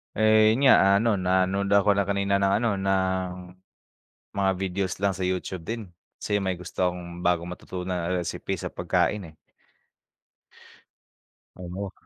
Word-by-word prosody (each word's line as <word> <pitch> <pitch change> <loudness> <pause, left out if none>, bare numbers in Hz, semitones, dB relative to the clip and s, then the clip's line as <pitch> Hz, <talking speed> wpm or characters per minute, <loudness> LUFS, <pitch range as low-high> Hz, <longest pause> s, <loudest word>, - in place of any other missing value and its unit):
Eh, 110 0 +5
yun 135 +5 +3
nga. - - +9
Ah, 100 0 +5
ano, 115 -1 +2
nanood 95 +1 +1
ako 100 0 +4
na 100 - +2
kanina 100 0 0
ng 100 0 +2
ano, 115 0 +1
ng 95 -1 0 1.1
mga 95 -1 +2
videos 95 -1 -2
lang 100 -1 +1
sa 95 - -4
Youtube 90 -1 -3
din. 115 +2 -5 0.3
Kasi 105 -1 -1
may 95 -2 -2
gusto 90 0 -1
akong 85 0 -8
bagong 85 -1 +1
matutunan 90 0 -7 0.2
na 90 - 0
recipe 85 - -4
sa - - -4
pagkain, 100 -6 -1
eh. - - -25 2.2
Oo. 90 +2 -6
95 Hz, 150 wpm, -26 LUFS, 90-100 Hz, 2.2 s, nga